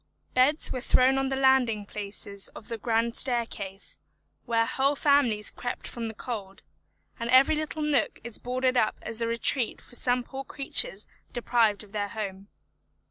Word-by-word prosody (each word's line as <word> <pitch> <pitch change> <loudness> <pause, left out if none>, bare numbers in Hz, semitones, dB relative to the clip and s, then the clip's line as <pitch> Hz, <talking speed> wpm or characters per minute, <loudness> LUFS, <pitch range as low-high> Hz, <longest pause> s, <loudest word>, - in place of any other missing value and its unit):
Beds 275 +5 +3
were 255 - -3
thrown 260 +1 +4
on 270 0 0
the 270 - -1
landing 260 -6 +3
places 200 -1 -4
of 220 - -11
the 230 -1 -4
grand 230 +1 0
staircase, 225 -6 -2 0.5
where 230 -1 +2
whole 270 +4 +1
families 275 -8 +3
crept 245 -1 -5
from 235 -1 -4
the 220 - -7
cold, 205 -5 -6 0.6
and 230 0 -3
every 265 +5 +6
little 310 0 -3
nook 285 -6 +1
is 235 -2 -5
boarded 255 +1 0
up 215 - +2
as 225 +1 -3
a 230 - +1
retreat 235 +1 0
for - - -16
some 245 0 +1
poor 270 +2 -7
creatures 270 -7 0 0.3
deprived 230 -4 +2
of 205 - -16
their 205 -1 -2
home. 200 -2 -6
235 Hz, 165 wpm, -27 LUFS, 215-265 Hz, 0.6 s, every